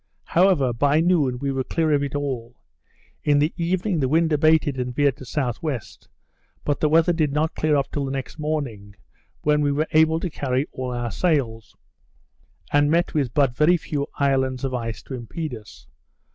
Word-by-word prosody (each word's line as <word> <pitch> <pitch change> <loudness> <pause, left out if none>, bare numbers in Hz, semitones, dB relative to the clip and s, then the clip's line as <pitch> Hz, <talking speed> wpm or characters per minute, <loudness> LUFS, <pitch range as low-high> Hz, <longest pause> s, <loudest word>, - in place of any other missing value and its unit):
However, 165 -8 +3
by 145 +5 +2
noon, 160 -7 +2
we 140 +2 -2
were 135 -1 -1
clear 160 +3 0
of 145 - +2
it 140 0 -3
all. 130 -4 -3 0.7
In 145 -1 +3
the 150 +3 +2
evening 180 +1 -1
the 135 - +1
wind 160 +1 +2
abated, 150 -2 +3
and 125 -1 -3
veered 145 -3 +2
to - - -17
S.W. 135 +2 -2 0.9
but 145 - -1
the 155 - +2
weather 165 +3 +4
did 155 -4 +1
not 155 +2 0
clear 155 -1 +1
up 140 -1 0
till 145 -2 -2
the 135 - -4
next 135 +3 -5
morning, 130 -10 -4 0.5
when 150 0 +3
we 145 -1 +2
were 150 +2 0
able 160 +1 +4
to 175 0 -4
carry 130 -1 -1
all 130 -1 -4
our 120 -1 -3
sails, 125 - -1 1.0
and 145 0 +4
met 170 +2 +1
with 140 -6 -1
but 135 -4 +2
very 160 +6 +4
few 145 -3 -3
islands 130 -2 +1
of 135 -1 -2
ice 115 -3 -4
to - - -9
impede 130 +5 -5
us. 105 -9 -11
145 Hz, 185 wpm, -23 LUFS, 130-155 Hz, 1.0 s, weather